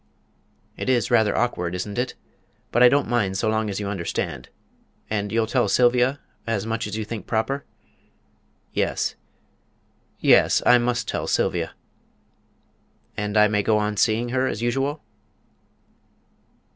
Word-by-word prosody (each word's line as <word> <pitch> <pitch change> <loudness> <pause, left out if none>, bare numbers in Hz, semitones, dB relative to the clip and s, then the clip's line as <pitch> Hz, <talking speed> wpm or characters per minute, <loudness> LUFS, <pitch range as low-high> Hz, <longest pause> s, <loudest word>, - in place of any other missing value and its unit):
"It's 125 -4 0
rather 110 -2 +3
awkward, 90 -8 -1
isn't 100 +5 -4
it? 125 0 -2 0.6
But 120 - +2
I 125 - +9
don't 145 +3 +2
mind 105 -5 0
so 110 - 0
long 110 0 0
as 100 - -3
you 100 - -3
understand. 95 -4 -4 0.6
And 105 -1 -1
you'll 115 0 +1
tell 125 +2 +1
Sylvia 125 +2 +3 0.3
as 110 -3 -1
much 115 -1 -2
as 105 +1 -5
you 110 - -3
think 110 0 -7
proper?" 135 +5 -1 1.1
"Yes - - -1 1.1
yes; - - +4
I 125 0 +6
must 120 0 -1
tell - - -3
Sylvia." - - 0 1.4
"And 105 0 -2
I 105 0 +6
may 105 0 +1
go 110 +1 +2
on 105 0 -1
seeing 115 +3 +1
her 130 +1 0
as 105 - -3
usual?" 135 +5 -1
110 Hz, 140 wpm, -23 LUFS, 105-125 Hz, 1.4 s, I